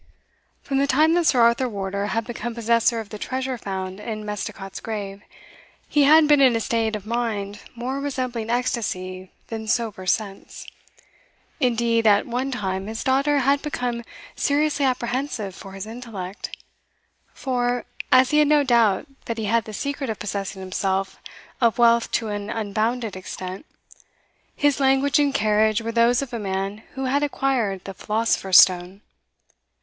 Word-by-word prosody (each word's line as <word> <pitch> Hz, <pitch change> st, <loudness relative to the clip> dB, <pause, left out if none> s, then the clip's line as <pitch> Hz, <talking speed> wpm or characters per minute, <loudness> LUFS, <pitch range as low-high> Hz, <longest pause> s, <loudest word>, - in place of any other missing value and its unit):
From 270 Hz, -1 st, -1 dB
the 280 Hz, -, +2 dB
time 310 Hz, +4 st, +4 dB
that 345 Hz, -1 st, +2 dB
Sir 250 Hz, -, +4 dB
Arthur 235 Hz, +2 st, +3 dB
Wardour 200 Hz, -1 st, -3 dB
had 225 Hz, +1 st, -1 dB
become 240 Hz, 0 st, -5 dB
possessor 230 Hz, 0 st, +2 dB
of 220 Hz, -2 st, -7 dB
the 210 Hz, -, -8 dB
treasure 260 Hz, +2 st, -3 dB
found 190 Hz, -3 st, -5 dB
in 215 Hz, 0 st, -5 dB
Misticot's 205 Hz, -1 st, -5 dB
grave, 205 Hz, -3 st, -5 dB, 0.7 s
he 290 Hz, -2 st, +3 dB
had 310 Hz, +1 st, +7 dB
been 295 Hz, -1 st, +5 dB
in 255 Hz, -3 st, +5 dB
a -, -, +1 dB
state 225 Hz, -1 st, 0 dB
of 210 Hz, -1 st, -7 dB
mind 215 Hz, -3 st, -2 dB, 0.2 s
more 255 Hz, +3 st, -3 dB
resembling 255 Hz, -5 st, -3 dB
ecstasy 185 Hz, -7 st, -2 dB, 0.2 s
than 220 Hz, -1 st, -5 dB
sober 215 Hz, -5 st, -1 dB
sense. 195 Hz, 0 st, -2 dB, 0.9 s
Indeed, 230 Hz, -3 st, +2 dB
at 205 Hz, -1 st, +5 dB
one 250 Hz, +3 st, -2 dB
time 195 Hz, -6 st, -3 dB
his 220 Hz, +1 st, -4 dB
daughter 280 Hz, +2 st, +2 dB
had 280 Hz, +2 st, +2 dB
become 245 Hz, -5 st, -3 dB, 0.3 s
seriously 290 Hz, 0 st, +1 dB
apprehensive 245 Hz, -4 st, -2 dB
for 195 Hz, +2 st, -11 dB
his 195 Hz, +1 st, -6 dB
intellect; 220 Hz, -5 st, -7 dB, 0.7 s
for, 245 Hz, -2 st, -1 dB, 0.3 s
as 255 Hz, 0 st, +6 dB
he 300 Hz, -, +4 dB
had 300 Hz, -, +5 dB
no 295 Hz, -1 st, +4 dB
doubt 230 Hz, -6 st, +3 dB, 0.2 s
that 230 Hz, -, -3 dB
he 220 Hz, -, -2 dB
had 230 Hz, +2 st, +1 dB
the 215 Hz, -, -8 dB
secret 280 Hz, +2 st, -3 dB
of 220 Hz, -, -3 dB
possessing 195 Hz, -1 st, -4 dB
himself 190 Hz, +1 st, -2 dB, 0.4 s
of 230 Hz, -3 st, +3 dB
wealth 235 Hz, -1 st, +4 dB
to 225 Hz, -2 st, 0 dB
an 205 Hz, 0 st, -4 dB
unbounded 220 Hz, +1 st, -1 dB
extent, 185 Hz, +5 st, -7 dB, 0.9 s
his 290 Hz, -1 st, +2 dB
language 270 Hz, +2 st, +3 dB
and 285 Hz, -2 st, +2 dB
carriage 215 Hz, 0 st, +3 dB
were 230 Hz, 0 st, -4 dB
those 235 Hz, +3 st, +3 dB
of 260 Hz, -3 st, -9 dB
a 235 Hz, -, -2 dB
man 195 Hz, +1 st, -3 dB
who 265 Hz, 0 st, -3 dB
had 275 Hz, +3 st, +1 dB
acquired 255 Hz, -9 st, 0 dB
the 195 Hz, -, -6 dB
philosopher's 210 Hz, -2 st, +2 dB
stone. 180 Hz, +2 st, +5 dB
230 Hz, 160 wpm, -23 LUFS, 205-260 Hz, 0.9 s, had